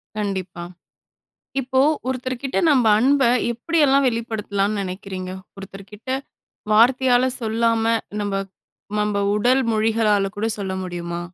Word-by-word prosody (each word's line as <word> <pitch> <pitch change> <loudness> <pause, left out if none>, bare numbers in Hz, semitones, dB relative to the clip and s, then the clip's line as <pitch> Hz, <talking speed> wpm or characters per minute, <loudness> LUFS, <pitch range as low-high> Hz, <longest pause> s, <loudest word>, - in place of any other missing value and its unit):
கண்டிப்பா. 190 -4 -4 1.0
இப்போ, 260 0 0 0.3
ஒருத்தர்கிட்ட 255 +1 -3
நம்ப 255 -5 +3
அன்ப 275 +4 +3 0.3
எப்படியெல்லாம் 280 +1 +2
வெளிப்படுத்தலான்னு 215 -3 -2
நெனைக்கிறீங்க? 185 0 -6 0.3
ஒருத்தர்கிட்ட 195 +4 -10 0.6
வார்த்தையால 250 +2 +4 0.2
சொல்லாம, 225 0 +1 0.4
நம்ப 205 -1 -2 0.7
நம்ப 210 -1 0 0.2
உடல் 245 +5 +3
மொழிகளால 215 -2 +2
கூட 210 +2 -1
சொல்ல 195 -2 -3
முடியுமா? 175 -1 -5
220 Hz, 95 wpm, -21 LUFS, 195-250 Hz, 1.0 s, வார்த்தையால